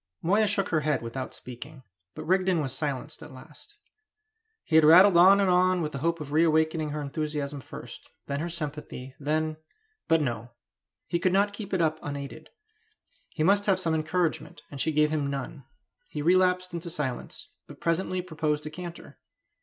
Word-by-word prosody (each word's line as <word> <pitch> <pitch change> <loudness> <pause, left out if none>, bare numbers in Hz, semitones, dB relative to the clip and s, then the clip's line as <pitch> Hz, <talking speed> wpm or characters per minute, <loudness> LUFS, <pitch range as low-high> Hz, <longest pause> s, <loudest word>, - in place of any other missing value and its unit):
Moya 205 +6 +3
shook 200 -1 0
her 160 - +2
head 150 -4 0
without 125 +3 -5
speaking, 130 +3 -10 0.3
but - - -6
Rigden 185 0 +2
was 135 -4 -2
silenced 145 +1 -4
at - - -10
last. 150 - -15 0.9
He 160 - -1
had 160 - +7
rattled 180 +5 +8
on 190 +3 +7
and 200 - +3
on 180 -1 +3
with 150 - -3
the 140 - -5
hope 165 +3 0
of 145 -2 -7
reawakening 160 0 +2
her 150 +1 -4
enthusiasm 145 -1 -3
first, - - -10 0.2
then 140 0 -3
her 170 +3 -3
sympathy, 150 -5 -6
then 155 +2 -1 0.5
but 165 0 +4
no! 120 -4 -3 0.5
He 170 - -1
could 185 +1 +1
not 200 +1 +2
keep 205 -1 -7
it 190 -3 +1
up 155 0 0
unaided; 140 -1 -7 0.8
he 155 - -2
must 200 +4 +3
have 190 -2 +3
some 165 -3 0
encouragement, 160 +1 -1
and 140 -2 -5
she 160 - +1
gave 150 0 +2
him 150 -3 0
none. 140 0 -5 0.4
He 150 - -5
relapsed 180 +1 +3
into 170 0 -5
silence, 150 -7 -4 0.2
but - - -12
presently 180 +2 -1
proposed 155 -3 -2
a 155 - -5
canter. 175 +1 -9
155 Hz, 175 wpm, -27 LUFS, 145-180 Hz, 0.9 s, rattled